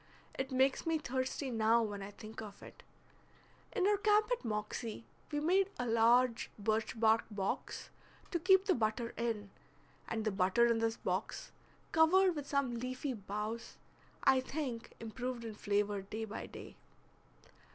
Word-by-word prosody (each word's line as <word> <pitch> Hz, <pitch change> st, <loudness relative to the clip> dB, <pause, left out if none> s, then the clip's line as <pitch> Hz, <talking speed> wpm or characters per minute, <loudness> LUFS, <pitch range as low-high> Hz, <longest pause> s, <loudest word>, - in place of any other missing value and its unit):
It 265 Hz, +1 st, -3 dB
makes 265 Hz, +5 st, +2 dB
me 325 Hz, -1 st, +3 dB
thirsty 260 Hz, -1 st, -2 dB
now 225 Hz, 0 st, +4 dB
when 205 Hz, -2 st, -4 dB
I 195 Hz, -, -6 dB
think 215 Hz, +2 st, -9 dB
of 205 Hz, -2 st, -10 dB
it. -, -, -12 dB, 0.9 s
In 400 Hz, -6 st, +1 dB
our 410 Hz, 0 st, +4 dB
camp 420 Hz, +3 st, +3 dB
at -, -, 0 dB
Moxie 220 Hz, +1 st, -3 dB, 0.3 s
we 295 Hz, -, 0 dB
made 370 Hz, +5 st, +3 dB
a 245 Hz, -, -2 dB
large 235 Hz, +1 st, +4 dB
birch 220 Hz, +1 st, -1 dB
bark 225 Hz, 0 st, +4 dB
box 200 Hz, -2 st, -3 dB, 0.4 s
to 345 Hz, -, 0 dB
keep 380 Hz, +2 st, +5 dB
the 380 Hz, -, +4 dB
butter 230 Hz, -1 st, 0 dB
in; 220 Hz, -4 st, -2 dB, 0.6 s
and 220 Hz, -1 st, -2 dB
the 215 Hz, -, +2 dB
butter 190 Hz, +5 st, +3 dB
in 235 Hz, -1 st, +3 dB
this 225 Hz, 0 st, 0 dB
box, 185 Hz, +3 st, -3 dB, 0.4 s
covered 355 Hz, +3 st, +5 dB
with 290 Hz, -2 st, -5 dB
some 280 Hz, -3 st, +1 dB
leafy 255 Hz, +3 st, -3 dB
boughs, 210 Hz, +2 st, -5 dB, 0.5 s
I 265 Hz, -1 st, +6 dB
think 260 Hz, -4 st, -4 dB
improved 240 Hz, +1 st, -4 dB
in 225 Hz, -, -5 dB
flavor 205 Hz, -1 st, 0 dB
day 215 Hz, +3 st, -5 dB
by 220 Hz, +1 st, -6 dB
day. -, -, -10 dB
235 Hz, 155 wpm, -35 LUFS, 215-275 Hz, 0.9 s, I